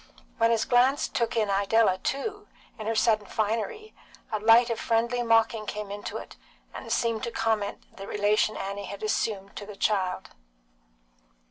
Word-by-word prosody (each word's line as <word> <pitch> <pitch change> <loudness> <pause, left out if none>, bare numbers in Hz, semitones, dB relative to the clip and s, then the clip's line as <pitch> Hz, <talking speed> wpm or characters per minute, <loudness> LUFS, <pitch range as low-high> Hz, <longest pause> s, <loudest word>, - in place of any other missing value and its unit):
When 230 0 +4
his 230 -1 +2
glance 255 +3 +3
took 235 -3 -1
in 215 -3 +1
Idella 200 0 +3
too, 415 - -3 0.3
in 215 - -5
her 225 - 0
sudden 215 -2 +2
finery, 230 - -2 0.4
a 215 - -1
light 230 +3 +5
of 230 - -2
friendly 235 +1 +1
mocking 225 -2 +2
came 210 -1 -5
into 205 0 -5
it, - - -10 0.4
and - - -8
seemed 230 -2 0
to 235 - -3
comment 220 -3 -1
the 195 - -8
relation 210 +1 +1
Annie 200 +1 -4
had 200 +1 -8
assumed 205 -2 -2
to 205 - -6
the 210 - -9
child. 190 -3 -1
220 Hz, 160 wpm, -27 LUFS, 205-230 Hz, 0.4 s, light